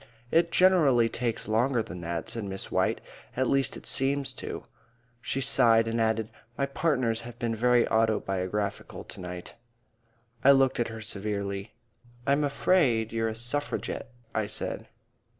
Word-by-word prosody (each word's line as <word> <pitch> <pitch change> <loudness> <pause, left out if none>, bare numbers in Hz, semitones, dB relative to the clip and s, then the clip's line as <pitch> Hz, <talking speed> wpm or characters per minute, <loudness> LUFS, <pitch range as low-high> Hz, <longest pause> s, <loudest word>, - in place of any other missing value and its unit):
"It 170 0 +3
generally 150 -12 +5
takes 115 -1 -2
longer 115 +2 +2
than 90 -2 -8
that," 85 0 -4
said 115 -3 -3
Miss 95 0 -6
White. - - +1 0.4
"At 130 0 +2
least 135 -1 +1
it - - -13
seems 135 +1 +1
to." - - -6 0.6
She 135 - -2
sighed 115 -4 +4
and 115 0 0
added, 110 0 0 0.3
"My 140 - +1
partners 130 -5 0
have 120 0 -10
been 115 -2 -1
very 120 +1 +3
autobiographical 105 -2 -1
to - - -10
night." 90 -1 -7 0.9
I 140 - +8
looked 135 -2 +3
at 120 - +1
her 110 -1 -7
severely. 100 -1 -3 0.5
"I'm 140 +2 +2
afraid 140 -7 +2
you're 115 0 0
a 110 - -5
Suffragette," 130 +3 -3 0.2
I 110 -1 0
said. - - -4
115 Hz, 150 wpm, -28 LUFS, 110-135 Hz, 0.9 s, I